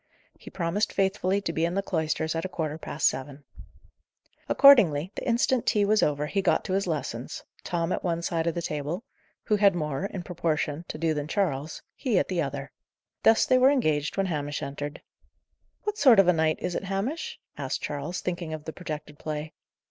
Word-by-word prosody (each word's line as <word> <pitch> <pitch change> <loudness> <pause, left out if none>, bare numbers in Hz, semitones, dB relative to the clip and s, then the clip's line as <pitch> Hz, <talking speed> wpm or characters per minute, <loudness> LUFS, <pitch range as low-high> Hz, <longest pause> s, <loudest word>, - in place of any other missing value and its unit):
He - - -13
promised 190 +4 -1
faithfully 195 0 +1
to 165 -4 -3
be 160 - 0
in 170 +2 0
the 195 - 0
cloisters 160 -3 -1
at 165 0 -2
a 190 - -3
quarter 160 -3 -3
past - - -3
seven. 140 +2 -3 1.1
Accordingly, 190 - +6
the - - -6
instant 240 +1 +2
tea 205 -1 +3
was 215 +1 +3
over, 150 0 +1
he 195 +6 0
got - - +2
to 185 - -2
his 195 0 0
lessons; 155 -4 -4 0.2
Tom 170 0 -1
at - - -1
one 170 -1 -1
side 165 -1 -1
of 170 - 0
the 170 - -3
table 150 - -3 0.4
who 210 - +2
had 200 -2 +5
more, 150 +1 -2
in 190 -3 -6
proportion, 165 -2 -2
to - - -6
do 160 0 +1
than 150 -1 -3
Charles 155 -5 -2
he 245 -8 0
at - - +1
the 180 -3 0
other. 140 -1 -4 0.5
Thus 225 0 +5
were 255 0 +5
they 280 - +5
engaged 155 - 0
when 195 - +2
Hamish 145 -4 -3
entered. 145 +1 -6 0.8
"What 420 0 -3
sort 255 -6 +7
of 195 -2 +6
a 180 - +6
night 160 -1 +1
is 180 - -3
it, 195 - -3
Hamish?" 255 - -3 0.2
asked - - -3
Charles, 150 +5 -3
thinking 175 -3 -3
of 155 - -10
the 160 - -5
projected 150 -4 -7
play. 155 0 -5
170 Hz, 200 wpm, -27 LUFS, 150-195 Hz, 1.1 s, sort